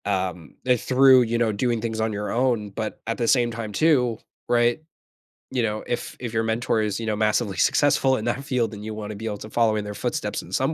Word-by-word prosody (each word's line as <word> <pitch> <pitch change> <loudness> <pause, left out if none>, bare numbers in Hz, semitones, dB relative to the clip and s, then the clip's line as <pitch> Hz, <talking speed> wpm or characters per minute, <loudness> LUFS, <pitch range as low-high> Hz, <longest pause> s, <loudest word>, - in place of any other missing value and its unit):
um, 95 -5 -2
if 125 -2 +2
through, 130 0 +6
you 115 0 -1
know, 115 -2 +2
doing 115 +3 0
things 110 -1 -2
on 110 0 0
your 105 0 -3
own, 120 -4 +1
but 110 +2 -5
at 115 - -1
the 120 - 0
same 120 -2 +3
time 115 -2 -5
too, 125 -3 +2 0.3
right? 120 +3 +2 0.7
You 125 -2 0
know, 110 -1 -2
if 120 - -4
if 120 -2 -5
your 110 0 +1
mentor 110 0 0
is, 105 -1 -1
you 115 - -4
know, 110 -1 0
massively 105 -1 +1
successful 135 -2 +3
in 110 - -5
that 120 +3 -1
field, 125 -6 0
then 105 -1 -8
you 110 0 -5
wanna 105 0 -6
be 110 +3 -7
able 105 -2 -3
to 110 - -9
follow 115 -1 +2
in 105 - -3
their 105 - -5
footsteps - - -3
in - - -14
some - - 0
115 Hz, 240 wpm, -24 LUFS, 105-120 Hz, 0.7 s, through